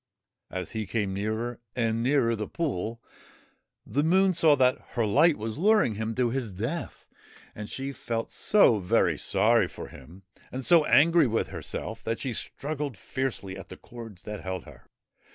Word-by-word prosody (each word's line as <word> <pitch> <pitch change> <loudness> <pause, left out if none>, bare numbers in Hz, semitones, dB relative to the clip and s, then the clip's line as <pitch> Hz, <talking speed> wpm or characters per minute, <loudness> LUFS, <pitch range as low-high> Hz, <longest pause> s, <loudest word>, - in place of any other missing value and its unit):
As 90 -2 -5
he 110 -2 -4
came 100 -2 -1
nearer 110 +4 -3 0.2
and 115 -2 0
nearer 125 -2 +2
the 105 -1 -4
pool, 115 - -3 0.8
the 145 - 0
Moon 190 +4 +4
saw 160 -3 +5
that 130 -2 +3
her 120 -3 +1
light 145 +10 +4
was 110 +4 -5
luring 210 - +4
him 110 +2 -3
to 125 -2 +1
his 120 -6 -3
death, 120 - -4 0.5
and 105 0 -7
she 135 +1 -4
felt 115 -3 -4
so 200 - +4
very 90 - +2
sorry - - +3
for - - -9
him, 85 +8 -14 0.3
and 130 0 -4
so 170 -3 +6
angry 165 0 +5
with 115 -1 -1
herself 110 +2 -5
that 115 0 -2
she 130 -3 -3
struggled 145 0 -4
fiercely 120 -8 -3
at 95 -1 -10
the - - -9
cords 115 -6 -11
that 105 -1 -6
held 95 -2 -5
her. - - -16
115 Hz, 170 wpm, -27 LUFS, 105-140 Hz, 0.8 s, so